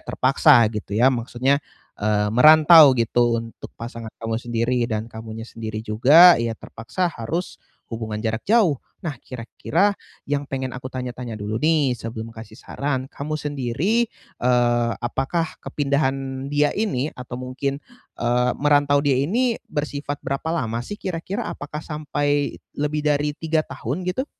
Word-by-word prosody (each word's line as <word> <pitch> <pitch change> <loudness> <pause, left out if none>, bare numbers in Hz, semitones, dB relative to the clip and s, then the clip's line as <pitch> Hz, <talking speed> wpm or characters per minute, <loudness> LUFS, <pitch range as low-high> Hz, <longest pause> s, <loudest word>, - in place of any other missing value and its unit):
terpaksa 135 0 +4
gitu 105 -2 -6
ya. 125 +4 +5
Maksudnya, 125 +3 0 0.4
eee, 105 0 +1
merantau 155 +3 +8
gitu 115 0 +2
untuk 115 0 -10
pasangan 115 -1 -7
kamu 115 0 -2
sendiri 120 +1 0
dan 110 -1 -2
kamunya 110 0 -8
sendiri 110 -1 -6
juga, 145 +12 +7
ya 115 -1 -1
terpaksa 175 +10 -3
harus 165 +11 -4 0.3
hubungan 110 -2 -4
jarak 110 0 -1
jauh. 200 - +3 0.2
Nah, 155 - -2
kira-kira 160 - -1 0.3
yang 145 0 -2
pengen 130 -1 -3
aku 130 +1 -6
tanya-tanya 125 -2 -5
dulu 105 +1 -4
nih 155 -5 +3
sebelum 115 0 -7
kasih 110 0 -11
saran, 140 -2 -3
kamu 155 +2 -4
sendiri, 150 - -1 0.3
eee, 120 -1 +2
apakah 135 +7 -2
kepindahan 135 -2 -1
dia 145 0 +2
ini 150 - -1
atau 125 -1 -8
mungkin, 130 +2 -3 0.4
eee, 125 +1 +1
merantau 145 0 +3
dia 135 -2 +2
ini 230 - 0
bersifat 145 -1 -4
berapa 135 +4 -3
lama 115 -5 -2
sih 205 +12 -6
kira-kira? 185 +1 -4
Apakah 150 +1 -7
sampai 145 -2 -1 0.2
lebih 150 0 -1
dari 150 0 +1
3 160 -1 0
tahun 155 +5 -5
gitu? 260 +10 -2
135 Hz, 140 wpm, -22 LUFS, 115-150 Hz, 0.4 s, merantau